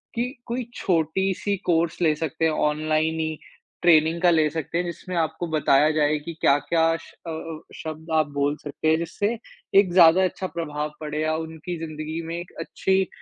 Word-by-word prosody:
कि 240 +2 0 0.2
कोई 240 0 -3
छोटी 185 +2 +1
सी 205 -1 -1
कोर्स 170 0 +1
ले 160 -3 +4
सकते 160 +1 -2
हैं 160 - +3
ऑनलाइन 155 +1 0
ही, 160 -1 -2 0.5
ट्रेनिंग 165 0 +5
का 180 - +5
ले 155 -2 +3
सकते 160 +1 -3
हैं 175 - 0
जिसमें 175 +1 -6
आपको 165 +1 -1
बताया 150 -2 +3
जाए 150 0 +3
कि 165 +3 -7
क्या-क्या 160 +4 +3
श - - -15 0.3
अ, 160 -1 -5 0.2
शब्द 160 +1 -7
आप 155 -1 +3
बोल 145 +1 +1
सकते 150 +1 -5
हैं 160 - +4
जिससे 205 +7 -2 0.4
एक 195 -3 +3
ज़्यादा 175 +1 +7
अच्छा 185 +1 -1
प्रभाव 150 -3 -4
पड़े 150 0 -3
या 155 0 +1
उनकी 160 +2 -5
ज़िंदगी 155 0 -5
में 165 - -4
एक 175 0 -7
अच्छी 190 -1 0
160 Hz, 180 wpm, -24 LUFS, 155-175 Hz, 0.5 s, ज़्यादा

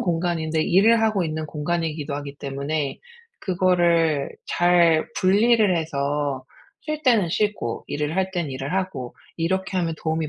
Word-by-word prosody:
공간인데 165 -2 0
일을 225 +7 +4
하고 215 -5 +2
있는 155 0 -3
공간이기도 155 -1 -3
하기 145 -1 -6
때문에 140 +1 -3 0.4
그거를 170 -5 +2 0.2
잘 175 -2 +3
분리를 210 0 +4
해서 145 -3 -2 0.4
쉴 305 0 -4
때는 230 - +3
쉬고 205 - -1
일을 150 +3 -2
할 190 0 0
때는 175 -6 -3
일을 135 +4 -5
하고 185 -10 -3 0.2
이렇게 190 +3 -1
하면 170 -3 0
도움이 160 -1 -2
165 Hz, 300 characters per minute, -23 LUFS, 150-185 Hz, 0.4 s, 일을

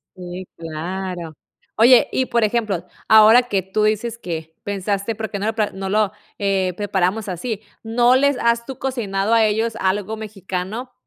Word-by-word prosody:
Sí, 180 0 -8
claro. 170 +1 -5 0.4
Oye, 240 +2 +6
y 260 - +1
por 235 -2 +1
ejemplo, 210 -5 0 0.2
ahora 220 +3 +7
que 200 -6 -1
tú 190 +3 -1
dices 215 +2 0
que 160 -5 -6
pensaste: 200 +2 -2
"¿Por 220 0 -4
qué 200 - -4
no 205 - -2
lo 220 - -1
pla 215 -2 0
no 190 0 -5
lo, 210 -1 +2 0.3
eh, 190 -2 +1
preparamos 200 +1 -1
así?" 210 +4 -4 0.2
¿No 240 +3 +3
les 280 0 +3
has, 235 0 +1
tú 265 - -7
cocinado 220 -5 -1
a 225 -1 +5
ellos 220 +2 0
algo 205 +3 -1
mexicano? 205 +3 -5
210 Hz, 170 wpm, -21 LUFS, 190-230 Hz, 0.4 s, ahora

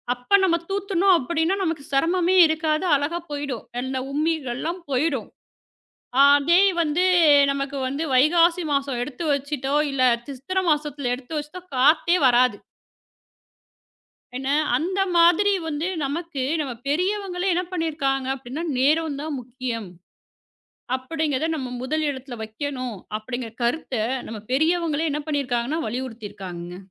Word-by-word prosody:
அப்ப 245 +11 +3
நாம 340 -3 +3
தூத்தணும் 390 -1 +2
அப்படின்னா, 325 +6 0
நமக்குச் 320 -6 -3
சிரமமே 345 +6 +2
இருக்காது. 315 +1 0
அழகா 290 +5 -1
போயிடும். 285 -5 -4 0.2
அந்த 260 0 -3 0.2
உம்மிகள்லாம் 310 +2 -2
போயிடும். 270 -1 0 1.0
அதே 285 +6 +5 0.2
வந்து 330 +2 +1 0.5
நமக்கு 275 0 -3
வந்து 280 +4 -3
வைகாசி 335 +6 +4
மாசம் 275 -3 0
எடுத்து 275 +5 -5
வச்சிட்டோ, 280 -1 -2
ம் 300 - +1
இல்ல 270 -2 0 0.3
சித்திர 275 +8 -4
மாசத்துல 295 -4 -1
எடுத்து 260 +5 -9
வச்சிட்டா 300 +5 -7 0.2
காத்தே 310 +6 +4
வராது. 250 -3 +4 1.8
என்ன, 265 +1 -4 0.3
அந்த 370 +5 -2 0.2
மாதிரி 345 +4 +5 0.2
வந்து 310 +2 -2 0.2
நமக்கு 290 0 -3 0.2
நம்ம 275 -4 -3 0.2
பெரியவங்களே 370 +4 -1
என்ன 355 +1 0
பண்ணிருக்காங்க 295 -6 -1
அப்படின்னா, 270 +4 -6 0.2
நேரம் 300 +2 +2
தான் 305 -2 -4
முக்கியம், 240 -4 -5 1.1
அப்படிங்கறத 300 +2 -2
நம்ம 260 -5 -5
முதல் 310 +4 -1
இடத்துல 260 -3 -6
வைக்கணும், 255 0 -5 0.2
அப்படிங்கற 245 +1 -6
கருத்தை 240 -2 -1 0.3
நம்ம 220 -2 -7
பெரியவங்களே 320 +2 +1
என்ன 300 +1 -2
பண்ணிருக்காங்கன்னா, 275 0 -1
வலியுறுத்தி 235 -2 -5
இருக்காங்கங்க. 175 -3 -8
290 Hz, 120 wpm, -23 LUFS, 255-330 Hz, 1.8 s, அதே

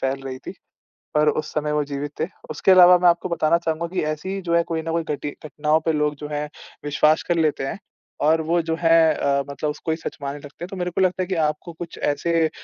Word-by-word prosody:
फैल 135 +1 -1
रही 130 -1 -6
थीं - - -4 0.7
और 150 0 +4
उस 155 - -2
समय 150 0 -1
वो 150 0 +1
जीवित 145 0 -5
थे। 160 - 0 0.2
उसके 190 - +2
अलावा 180 -1 +8
मैं 175 -1 +6
आपको 170 +1 0
बताना 170 -1 +2
चाहूँगा 165 0 -2
कि 185 - 0
ऐसी 190 +6 -4
जो 170 -1 0
है, 170 - +4
कोई 165 -1 -3
ना 165 0 -4
कोई 165 0 0
घटि 145 +1 -5
घटनाओं 150 +1 +1
पे 160 - +3
लोग 150 0 0
जो 150 +1 -7
हैं 150 0 -2 0.4
विश्वास 150 +1 +3
कर 175 - +2
लेते 155 -4 +1
हैं 200 - -5 0.5
और 160 +1 +4
वो 170 +2 +1
जो 160 0 -2
हैं 165 -1 +5
अ, 140 -1 +1
मतलब 145 +2 -3
उसको 155 +2 -4
ही 160 - -1
सच - - -6
मानने 140 +1 -4
लगते 145 +3 -11
हैं। - - -10
तो 195 - -7
मेरे 180 -1 -2
को 190 - -1
लगता 185 0 +2
है - - -6
कि 185 - -1
आपको 165 +3 -7
कुछ 165 +1 -8
ऐसे 165 +3 +1
अ, - - -9
160 Hz, 255 wpm, -23 LUFS, 150-170 Hz, 0.7 s, अलावा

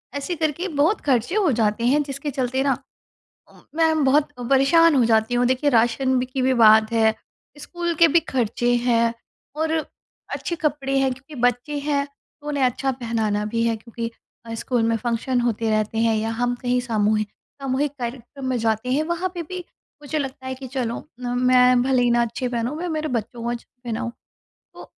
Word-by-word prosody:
ऐसे 285 +5 -3
करके 315 +4 -1
बहुत 330 +9 +3
ख़र्चे 260 - +1
हो 390 -8 +3
जाते 225 -1 +1
हैं 290 +3 +3
जिसके 280 +1 -5
चलते 260 0 -1
ना 275 -2 +1 0.7
उम, - - -19 0.2
मैं 320 -3 +3
बहुत 290 +3 +3 0.2
परेशान 295 +5 +5
हो 255 -4 +4
जाती 225 +1 +2
हूँ। 245 0 +3
देखिए, 260 +3 +2
राशन 255 +2 +2
बि 250 - -1
की 255 +1 -3
भी 260 0 +3
बात 220 -1 +6
है, 220 -1 +3 0.4
स्कूल 345 +3 -3
के 335 - +7
भी 335 +2 +4
खर्चे 245 -4 0
हैं 230 -1 +3 0.4
और 320 +1 0 0.6
अच्छे 340 - -4
कपड़े 285 -4 -1
हैं 265 -1 +2
क्योंकि 265 +4 -14
बच्चे 245 +4 +1
हैं 285 -1 0
तो 285 +1 -22
उन्हें 285 -2 +1
अच्छा 255 +2 0
पहनाना 225 -4 -1
भी 230 +2 -1
है 230 - +1
क्योंकि 230 +1 -6 0.4
अ, 230 - -5
स्कूल 240 +1 -1
में 225 0 +2
फंक्शन 240 +2 -1
होते 230 -2 0
रहते 215 +1 0
हैं 225 -1 +2
या 220 +1 -1
हम 245 +2 0
कहीं 250 0 +1
सामूहिक 215 -3 0 0.3
सामूहिक 270 +2 0
कार्यक्रम 245 +2 -6
में 255 - 0
जाते 225 +2 0
हैं। 290 - +2
वहाँ 345 +3 -1
पे 345 - -3
भी 365 +3 -7 0.4
मुझे 305 +2 -2
लगता 265 -1 -5
है 260 - -3
कि 260 0 -9
चलो 245 -3 -3 0.2
न 245 - -4 0.2
मैं 250 -1 +5
भले 255 -1 +2
ही 245 - +3
ना 240 0 +3
अच्छे 235 +2 -2
पहनूँ, 240 +4 -2
मैं 355 +3 -3
मेरे 310 -1 -2
बच्चों 235 -1 -4
को 235 - -2
अच्छा 240 -1 -5 0.2
पहनाऊँ। 235 0 -3 0.6
तो - - -11
255 Hz, 195 wpm, -23 LUFS, 230-285 Hz, 0.7 s, के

